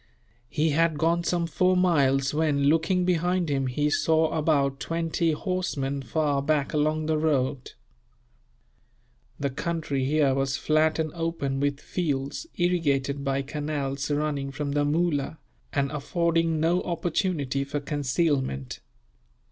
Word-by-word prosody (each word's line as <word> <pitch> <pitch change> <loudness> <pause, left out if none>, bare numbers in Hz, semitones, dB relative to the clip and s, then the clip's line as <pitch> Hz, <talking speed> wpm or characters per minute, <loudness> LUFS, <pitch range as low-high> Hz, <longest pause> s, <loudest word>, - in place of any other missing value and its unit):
He 155 +1 +1
had 160 +1 +2
gone 170 +3 +1
some 170 -1 0
four 185 +3 +2
miles 140 -7 +3
when, 150 -2 +1
looking 165 +5 +2
behind 180 -1 +1
him, 135 -1 0
he 145 +4 0
saw 160 +1 +2
about 140 -3 +1
twenty 165 0 0
horsemen, 150 -6 -2
far 145 +1 0
back 145 -1 0
along 155 +1 +1
the 155 0 +1
road. 140 -4 0 1.7
The 140 -1 -1
country 150 -1 -2
here 145 -1 +3
was 135 -1 0
flat 155 0 +2
and 155 -2 -2
open, 165 -5 -2
with 140 0 0
fields 145 - -3
irrigated 140 -6 +1
by 135 0 0
canals 145 -1 -3
running 145 -2 -1
from 140 +1 -4
the 145 0 +1
Moola, 155 -1 0 0.3
and 140 -1 0
affording 165 +1 0
no 170 +3 +2
opportunity 165 -5 -1
for 140 +1 -3
concealment. 140 - -1
150 Hz, 130 wpm, -26 LUFS, 140-165 Hz, 1.7 s, miles